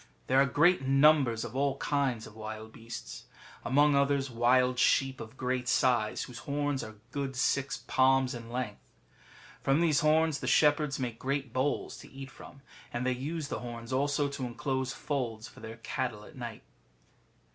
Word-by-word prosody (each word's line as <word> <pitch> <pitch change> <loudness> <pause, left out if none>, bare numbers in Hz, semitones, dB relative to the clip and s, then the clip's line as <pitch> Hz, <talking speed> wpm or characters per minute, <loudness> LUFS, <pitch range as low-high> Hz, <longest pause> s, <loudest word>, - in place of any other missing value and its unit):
There 130 +1 +4
are 140 - +4
great 170 +6 +4
numbers 135 -4 +4
of 120 +1 -8
all 140 0 +1
kinds 135 -7 0
of 105 - -13
wild 110 0 -7
beasts; 115 - -8 0.4
among 145 +3 +4
others, 140 -1 +2
wild 125 +2 +3
sheep 135 0 +2
of 115 +3 -10
great 125 -1 -2
size, 120 -3 +2
whose 120 -2 -9
horns 145 -1 -2
are 110 0 -9 0.2
good 135 -1 -3
six 140 +2 0
palms 130 0 +3
in 115 -1 -8
length. 120 -4 -5 0.7
From 135 +3 +2
these 160 -4 +3
horns 155 -1 +3
the - - -5
shepherds 150 -2 +3
make 120 -4 -4
great 135 -2 -2
bowls 130 +3 -1
to - - -13
eat 135 0 -9
from, 140 -2 -14 0.3
and 120 +1 -3
they 130 - +2
use 145 +4 -3
the - - -3
horns 120 0 -7
also 140 +2 +1
to 140 -1 -5
enclose 130 +2 -2
folds 120 -7 -3
for 110 - -15
their 110 +1 -8
cattle 125 -3 -3
at - - -14
night. 120 -4 -7
130 Hz, 170 wpm, -30 LUFS, 120-140 Hz, 0.7 s, There